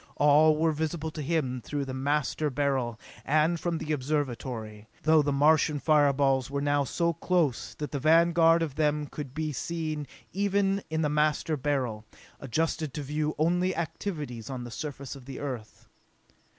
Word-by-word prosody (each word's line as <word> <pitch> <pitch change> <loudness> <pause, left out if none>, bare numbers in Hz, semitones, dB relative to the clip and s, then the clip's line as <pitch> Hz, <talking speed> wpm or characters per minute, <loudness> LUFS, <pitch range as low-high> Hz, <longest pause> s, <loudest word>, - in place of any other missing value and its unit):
All 150 +1 +5
were 160 +1 +2
visible 160 +1 -3
to 155 - -6
him 135 -5 -1
through 145 -1 -3
the 130 - -5
Master 145 +3 0
Beryl, 130 -4 -1 0.2
and 155 +3 +2
from 170 +1 -1
the 155 - -4
Observatory, 125 -7 -3 0.2
though 155 -1 +5
the 145 0 0
Martian 150 +2 +3
fire 150 -1 +4
balls 135 -2 +1
were 140 0 -2
now 145 0 +2
so 170 +5 0
close 165 -5 0
that 150 - -5
the 140 - -2
vanguard 165 +2 +5
of 155 -4 -3
them 150 0 +1
could 145 0 -6
even 130 - -19
be 155 -1 -2
seen 155 0 -3 0.8
in 160 0 -1
the - - +2
Master 150 +1 +1
Beryl, 130 -6 -1 0.4
adjusted 155 +2 -2
to 150 - -3
view 150 +2 -2
only 180 +4 +1
activities 150 - -4
on 130 -2 -5
the 120 - -8
surface 140 +1 -6
of 135 -3 -12
the 135 -1 -7
Earth. 125 -6 -6
150 Hz, 165 wpm, -28 LUFS, 135-155 Hz, 0.8 s, All